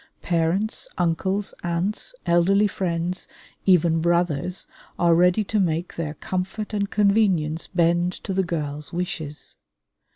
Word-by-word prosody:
Parents, 175 +5 0
uncles, 190 +4 0
aunts, 180 - -2
elderly 185 +4 +4
friends, 180 -2 -2 0.4
even 170 -3 +4
brothers, 170 0 0 0.3
are 170 -1 +4
ready 180 +5 +4
to 210 +1 -1
make 170 -2 0
their 155 -2 -4
comfort 190 +4 -4
and 200 -1 0
convenience 200 -7 +2
bend 175 0 +2
to 195 - -3
the 190 - +2
girls' 150 -4 -4
wishes. 170 -4 -5
175 Hz, 120 wpm, -24 LUFS, 165-195 Hz, 0.4 s, elderly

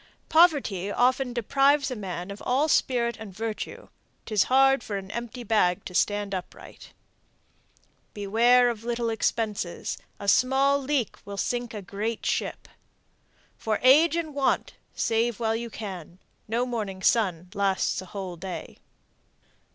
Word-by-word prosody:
Poverty 285 - +3
often 250 +3 +2
deprives 275 +4 +2
a - - -2
man 185 -3 -5
of 200 - -9
all 270 +5 +2
spirit 240 -5 +1
and 220 -3 -8
virtue, 220 +3 -5 0.4
'Tis 215 -4 +2
hard 270 -1 +4
for 205 - -4
an 195 0 -7
empty 240 +1 -6
bag 200 -5 +1
to 180 - -7
stand 205 +1 0
upright. 185 -2 -8 1.2
Beware 235 +4 +4
of 225 -1 -8
little 235 -1 -1
expenses; 215 -5 -2 0.2
a 200 - -7
small 270 +5 +4
leak 270 -3 -1
will 200 0 -8
sink 240 +1 -2
a 205 - -6
great 210 +4 -4
ship. - - -2 0.9
For 215 -1 0
age 305 +6 +6
and 325 -3 -3
want, 275 -1 0 0.2
save 230 0 0
while 225 -1 0
you 235 +1 -4
may. 190 -6 -5 0.4
No 235 +3 0
morning 210 -6 -4
sun 180 -6 +1
lasts 200 -2 0
a 185 - -11
whole 185 -3 -6
day. 185 +1 -7
225 Hz, 140 wpm, -26 LUFS, 200-250 Hz, 1.2 s, age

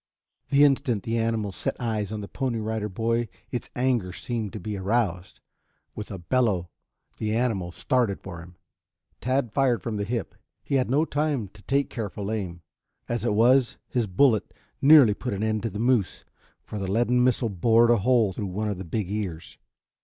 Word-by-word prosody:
The 140 0 +5
instant 135 -7 +2
the 115 0 -1
animal 115 -3 -1
set - - -3
eyes 110 -4 -2
on 110 -1 -4
the 100 - -6
Pony 130 -1 -2
Rider 110 -1 -2
Boy 115 +4 0 0.2
its 120 - -4
anger 120 -7 +1
seemed 110 +1 -4
to - - -5
be 105 +3 -4
aroused. 95 -3 -1 0.5
With 105 - -7
a 95 - -5
bellow 95 -2 0 0.5
the 110 0 -1
animal 110 -8 0
started 110 +4 0
for 85 - -8
him. 90 +1 -14 0.6
Tad 130 -3 0
fired 130 -6 +2
from 115 -3 -3
the 100 - -1
hip. 115 +3 -3 0.3
He - - -5
had 130 -3 +2
no 145 +5 +3
time 145 -9 -1
to 105 +1 -18
take 140 +7 0
careful 105 -2 -4
aim. 90 -6 -4 0.4
As 120 -1 -2
it 120 -3 +1
was, 125 +3 +4
his 120 -3 0
bullet 110 +4 +2 0.3
nearly 140 -6 +8
put 125 +2 -4
an 100 +2 -2
end 110 -1 0
to 115 - -2
the 105 - -7
moose, 115 -4 +1 0.4
for 105 - -6
the 95 -1 -3
leaden 120 +3 +3
missile 125 -2 +2
bored 115 +5 +4
a 120 - +5
hole 115 -2 +3
through 100 +2 -4
one 105 +4 -2
of 100 -3 -3
the - - -4
big 95 +4 -2
ears. 95 -5 -5
110 Hz, 190 wpm, -26 LUFS, 100-125 Hz, 0.6 s, nearly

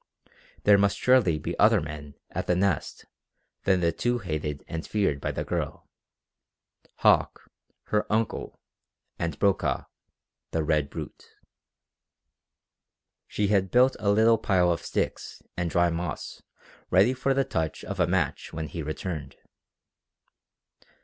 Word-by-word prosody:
There 100 -1 +6
must 100 0 +2
surely 125 -11 +4
be 75 - -4
other - - +6
men 75 -1 -7 0.2
at - - -4
the 90 - +3
Nest 95 -2 -1 0.6
than 95 -2 +3
the 85 -1 +2
two 120 +8 0
hated 75 -7 -4
and 80 0 -4
feared 95 -10 0
by - - -2
the - - -3
girl - - -4 1.2
Hauck, - - +3 0.4
her 105 0 -1
uncle, 110 +1 -1 0.6
and 85 -3 -2
Brokaw, 100 -2 +1 0.7
the 80 - -1
"red 75 -2 +1
brute." - - -9 1.9
She 105 -1 -1
had 95 -2 +2
built 125 +4 +4
a 105 -1 0
little 110 +2 +4
pile 90 -3 +2
of 85 -1 -1
sticks - - -3
and 85 -1 -1
dry 85 +1 +2
moss 85 -1 -5 0.5
ready 100 +8 +4
for 135 +1 0
the 135 - +3
touch 80 - -3
of 100 -1 -6
a 90 - +3
match 90 -4 -1
when 80 -2 -5
he 85 +3 -5
returned. 75 -1 -5
90 Hz, 135 wpm, -27 LUFS, 80-105 Hz, 1.9 s, There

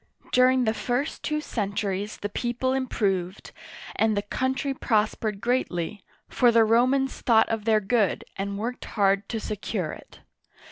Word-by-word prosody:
During 255 0 +4
the 220 -2 +1
first 245 +6 -2
two 305 -1 -1
centuries 205 -4 -3
the 205 - -4
people 245 +4 -1
improved, 195 -8 -1 0.4
and 220 -1 +2
the 205 - 0
country 260 +6 -1
prospered 215 -4 0
greatly, 210 -6 -1 0.2
for 245 -2 +3
the 230 -1 +5
Ro 230 +3 +4
mans 270 0 0
thought 225 -3 +4
of 225 -2 -2
their 220 -1 +4
good 210 0 +1
and 200 +1 -3
worked 235 +4 -4
hard 200 -1 +1
to 225 - -2
secure 205 -5 -3
it. - - -13
220 Hz, 150 wpm, -26 LUFS, 205-250 Hz, 0.4 s, the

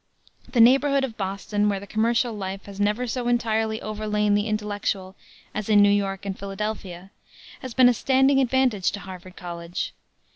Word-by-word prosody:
The 250 - 0
neighborhood 275 +3 +5
of 245 -4 -3
Boston, 205 +1 -1
where 200 -1 -1
the 200 - -10
commercial 230 +3 +1
life 195 -1 -5
has 200 -1 -10
never 210 +4 +1
so 245 0 -3
entirely 220 -2 0
overlain 210 -1 0
the 205 +1 +1
intellectual 205 -3 -2 0.4
as 215 0 -4
in 205 -1 +6
New 205 - +5
York 195 -1 -1
and 195 -1 -3
Philadelphia, 195 -2 -5 0.5
has 255 -3 -8
been 255 -1 +7
a 245 - +5
standing 265 +3 +3
advantage 255 -6 +2
to 205 - -5
Harvard 185 -1 -10
College. 170 -1 -5
210 Hz, 170 wpm, -24 LUFS, 195-235 Hz, 0.5 s, been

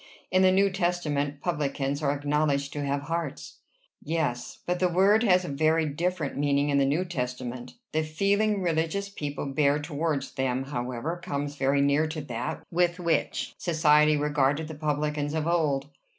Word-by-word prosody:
In 185 +1 +4
the 185 0 +6
New 195 +1 +3
Testament, 150 -6 -1
publicans 145 -3 -1
are 140 -2 +2
acknowledged 145 -1 0
to 145 - -3
have 140 0 -1
hearts." 165 -2 -4 0.4
"Yes; 145 -6 -2
but 180 0 -1
the 180 - +3
word 195 +5 +4
has 185 -5 +4
a - - -5
very 155 +2 +2
different 165 +1 -2
meaning 145 0 +1
in 140 -1 +3
the 135 - +3
New 160 +7 +1
Testament." 125 -5 -5 0.2
"The 155 - +1
feeling 200 +6 +1
religious 165 +4 0
people 145 -8 -5
bear 140 +1 +2
towards 150 -2 -2
them, 130 0 -1
however, 135 +5 -4
comes 145 0 -3
very 140 0 +2
near 140 +3 +3
to 155 0 -4
that 120 -5 -4
with 175 0 +2
which 170 -2 -1
society 155 -2 +4
regarded 145 +1 +1
the - - -5
publicans 150 0 -1
of 155 -1 -1
old." 150 -5 +1
150 Hz, 165 wpm, -27 LUFS, 140-170 Hz, 0.4 s, the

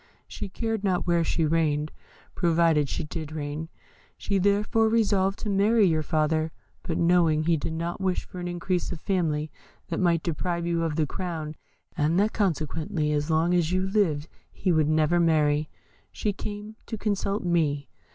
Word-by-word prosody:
She 205 - -6
cared 225 +1 -2
not 185 -3 +1
where 170 -1 +2
she 165 0 +1
reigned, 155 -1 +1 0.4
provided 165 -4 +2
she - - -2
did 155 0 -6
reign. 155 +1 -4 0.5
She 200 -1 0
therefore 205 +3 +2
resolved 200 -4 +2
to 215 - -3
marry 205 +2 +4
your 160 -3 +2
father; 155 +1 0 0.3
but 165 -3 -3
knowing 170 -3 +3
he 165 +1 +3
did 160 +1 -3
not 170 +3 -3
wish 185 -1 0
for 180 - -9
an 175 - -4
increase 175 +1 -2
of 175 - -5
family 155 -5 -1 0.4
that 165 - -2
might 170 -3 +2
deprive 170 +1 -2
you 170 -1 0
of 165 -2 -1
the 155 -1 +2
crown, 160 -2 -5 0.4
and 155 +4 +2
that 210 +2 +2
consequently 155 -4 -1
as 150 +1 0
long 165 +2 +2
as 175 -2 +2
you 185 +1 +1
lived 175 -7 +1 0.2
he 185 - -1
would 155 -2 +3
never 155 +2 +3
marry, 150 -2 +2 0.4
she 210 - -2
came 210 +2 -7
to 225 - -4
consult 205 0 -1
me. 155 -5 +1
170 Hz, 170 wpm, -26 LUFS, 155-190 Hz, 0.5 s, marry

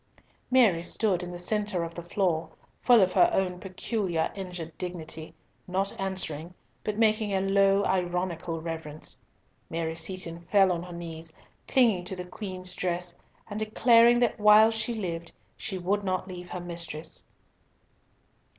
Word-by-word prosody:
Mary 230 -10 +5
stood 185 +1 +1
in 180 - -5
the 175 - -6
centre 205 0 -1
of 165 0 -5
the 170 - -6
floor, 170 -2 0 0.3
full 240 -5 +6
of 185 0 +1
her 345 - +6
own 180 - 0
peculiar 185 -3 -1
injured 180 -5 -6
dignity, 165 -3 -5 0.4
not 190 +2 0
answering, 180 -3 -3 0.3
but 210 -1 -2
making 215 -1 +2
a - - +2
low 195 +1 +3
ironical 180 -2 -1
reverence. 160 -2 -6 0.5
Mary 160 0 -2
Seaton 170 0 -4
fell 190 +2 +4
on 170 -1 -1
her 180 0 -9
knees, 165 -1 -7 0.4
clung 225 -9 +3
to 190 - -4
the 180 -1 -6
Queen's 185 -1 -6
dress, 180 -1 -2 0.3
and 210 0 -5
declared 230 +2 +5
that 235 - 0
while 210 +1 +7
she 225 +1 -2
lived, 170 -5 -4 0.2
she 195 - -4
would 195 +3 0
not 185 -1 -1
leave 180 -1 -8
her 180 - -4
mistress. 170 -3 -5
185 Hz, 150 wpm, -28 LUFS, 170-205 Hz, 0.5 s, while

